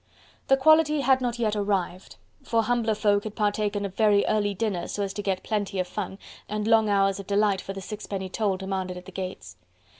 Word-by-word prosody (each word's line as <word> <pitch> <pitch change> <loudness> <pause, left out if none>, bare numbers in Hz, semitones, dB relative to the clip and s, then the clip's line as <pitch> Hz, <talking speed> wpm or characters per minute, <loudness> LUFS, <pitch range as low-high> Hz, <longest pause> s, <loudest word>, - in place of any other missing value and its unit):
The 270 - +5
quality 305 +1 +4
had 265 0 +3
not 240 -1 -1
yet 220 -3 0
arrived: 195 -3 -2 0.3
for 230 -1 +1
humbler 230 -1 +1
folk 205 -1 +2
had 215 -1 -6
partaken 205 -1 0
of 195 - -5
very 205 -1 +3
early 205 -2 +1
dinner 200 -3 -2
so 205 - -3
as 195 -1 -3
to 205 - -4
get 190 -2 -2
plenty 205 -3 -2
of 185 -1 0
fun, 195 0 -5 0.3
and 210 0 -2
long 225 -1 +4
hours 195 -1 +2
of 195 - -8
delight 200 -1 +2
for 195 - -6
the 195 - -7
sixpenny 195 -1 -5
toll 195 0 -1
demanded 190 -1 -4
at 180 - -10
the 190 - -10
gates. 180 - -7
205 Hz, 210 wpm, -26 LUFS, 195-220 Hz, 0.3 s, The